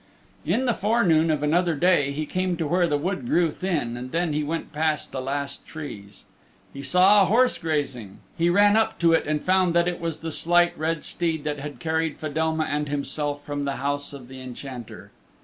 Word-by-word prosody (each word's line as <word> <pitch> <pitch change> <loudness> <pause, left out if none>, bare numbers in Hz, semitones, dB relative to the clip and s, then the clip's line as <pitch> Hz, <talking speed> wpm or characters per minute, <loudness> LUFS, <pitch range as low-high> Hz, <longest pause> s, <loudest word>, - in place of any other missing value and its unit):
In 225 +11 +1
the 240 - +2
forenoon 195 -8 +2
of 150 -2 0
another 170 +2 +2
day 145 -3 +3
he 150 +2 -3
came 185 +2 -1
to 165 - -1
where 175 +3 +2
the 145 -2 +1
wood 150 -4 -3
grew 170 +2 +2
thin 150 -10 -2
and 125 +1 -7
then 170 -1 0
he 150 +1 0
went 160 +1 -4
past 155 0 -1
the 130 - -4
last 140 +1 -4
trees. 105 - -9 0.5
He 140 - -7
saw 190 +6 +5
a - - +5
horse 250 +6 +3
grazing: 140 -10 -3 0.2
he 170 +1 +2
ran 205 +3 +5
up 220 0 +2
to 170 -1 +3
it 165 - +2
and 150 0 -1
found 185 -2 +3
that 170 0 +3
it 175 -1 -3
was 165 -2 -2
the 165 0 -4
Slight 175 +2 +3
Red 160 0 -2
Steed 165 -3 -2
that 150 -1 -3
had 145 +1 -7
carried 160 -1 -1
Fedelma 160 +1 -1
and 150 -1 -2
himself 145 0 -3
from 145 -1 -3
the 140 -1 -2
house 145 0 -2
of 135 -4 -10
the 130 0 -10
Enchanter. 125 -1 -9
155 Hz, 205 wpm, -24 LUFS, 145-175 Hz, 0.5 s, saw